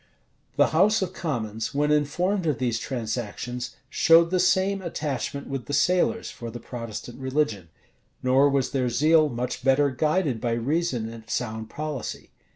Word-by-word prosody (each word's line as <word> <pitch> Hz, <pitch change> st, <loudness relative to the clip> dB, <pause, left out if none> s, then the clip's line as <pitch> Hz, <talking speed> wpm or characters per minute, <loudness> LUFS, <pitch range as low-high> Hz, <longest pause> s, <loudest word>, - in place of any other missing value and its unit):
The -, -, +4 dB
house 195 Hz, +6 st, +3 dB
of 185 Hz, 0 st, -4 dB
commons, 115 Hz, -, -3 dB
when 150 Hz, +1 st, +2 dB
informed 170 Hz, +6 st, +1 dB
of 150 Hz, -5 st, +1 dB
these 120 Hz, -2 st, 0 dB
transactions, 120 Hz, +1 st, -4 dB
showed 165 Hz, +1 st, +5 dB
the 185 Hz, -, +2 dB
same 190 Hz, +2 st, +2 dB
attachment 145 Hz, -5 st, -3 dB
with 135 Hz, -3 st, -5 dB
the 145 Hz, -, -1 dB
sailors 180 Hz, +10 st, +2 dB
for 115 Hz, -, -7 dB
the 120 Hz, +1 st, -7 dB
Protestant 115 Hz, 0 st, -7 dB
religion; 130 Hz, -, -1 dB, 0.5 s
nor 130 Hz, +3 st, +4 dB
was 135 Hz, -2 st, 0 dB
their 130 Hz, -3 st, 0 dB
zeal 155 Hz, +5 st, +4 dB
much 125 Hz, 0 st, -4 dB
better 135 Hz, +1 st, +3 dB
guided 150 Hz, -, 0 dB
by 120 Hz, -1 st, 0 dB
reason 125 Hz, 0 st, -1 dB
and 115 Hz, -1 st, -10 dB
sound 110 Hz, -2 st, -3 dB
policy. 150 Hz, -2 st, -5 dB
135 Hz, 155 wpm, -25 LUFS, 120-160 Hz, 0.5 s, showed